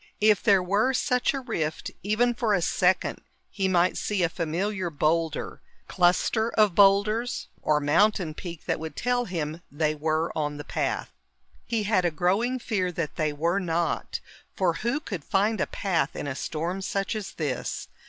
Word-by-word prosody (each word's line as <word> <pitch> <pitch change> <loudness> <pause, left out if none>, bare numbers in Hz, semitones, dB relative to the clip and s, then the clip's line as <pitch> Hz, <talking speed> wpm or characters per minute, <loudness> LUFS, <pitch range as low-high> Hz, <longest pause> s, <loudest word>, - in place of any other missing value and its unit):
If 210 -1 +4
there 200 -5 +4
were 210 +8 +2
such 250 -1 +2
a 275 - -3
rift, 160 -10 -3
even 225 +5 +2
for 230 -3 +1
a 180 - 0
second, 180 +1 +1 0.3
he 195 -1 0
might 180 -1 +2
see 205 -4 0
a 170 - +2
familiar 180 +4 -2
boulder, 160 +1 -1 0.3
cluster 185 +5 +2
of 210 -4 +4
boulders, 205 +5 +3
or 150 -1 +2
mountain 165 +3 +2
peak 170 0 -8
that - - -1
would 160 -2 -6
tell 245 0 0
him 165 -3 -4
they 155 +1 0
were 155 +2 -1
on 150 -1 -2
the 145 - -6
path. - - -2 0.6
He 225 -2 0
had 205 -3 +2
a 175 - +3
growing 195 +10 +1
fear 200 -7 -1
that 165 -3 -4
they 155 -2 0
were 165 +6 0
not, 170 -2 -1 0.4
for 180 -3 +2
who 240 +6 0
could 195 - -6
find 210 +4 +1
a - - +1
path 165 -8 -1
in - - -4
a 140 - -2
storm 165 +7 -3
such 195 +2 -2
as 195 -2 -5
this? 145 -6 -3
185 Hz, 175 wpm, -26 LUFS, 160-210 Hz, 0.6 s, If